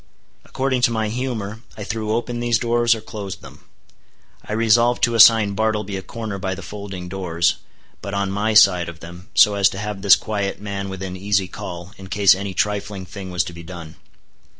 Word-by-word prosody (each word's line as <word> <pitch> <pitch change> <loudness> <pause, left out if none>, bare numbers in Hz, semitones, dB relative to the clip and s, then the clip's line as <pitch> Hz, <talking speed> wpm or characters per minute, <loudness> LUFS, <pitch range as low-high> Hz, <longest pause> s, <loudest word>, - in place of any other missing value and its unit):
According 130 -1 -1
to 120 - +3
my 110 -2 -1
humor 115 -3 -4 0.2
I 105 - -5
threw 110 +1 -3
open 120 +1 -2
these 120 -1 +2
doors, 120 0 +2
or 110 - -8
closed 100 -3 -7
them. - - -14 0.8
I - - -6
resolved 115 +2 +3
to 120 -1 +3
assign 110 -2 +7
Bartleby 105 -1 -1
a 95 - -4
corner 105 0 -6
by 95 0 -2
the 95 - -9
folding 95 -2 -7
doors, 85 -2 0 0.4
but 100 0 -5
on 100 -1 -1
my 105 +2 -1
side 90 -5 +6
of 85 -1 -11
them, 85 +5 -12
so 105 - +6
as 100 -1 +3
to - - -8
have 105 -1 -5
this 100 0 +7
quiet 100 -3 -3
man 100 -1 -5
within 95 -1 -6
easy 100 0 0
call, 90 0 -8
in 95 - -10
case 100 +1 +5
any 95 0 -5
trifling 100 -2 -2
thing 95 0 -8
was 90 -2 0
to 90 - -8
be 85 - -10
done. 85 -2 -9
100 Hz, 195 wpm, -21 LUFS, 95-110 Hz, 0.8 s, assign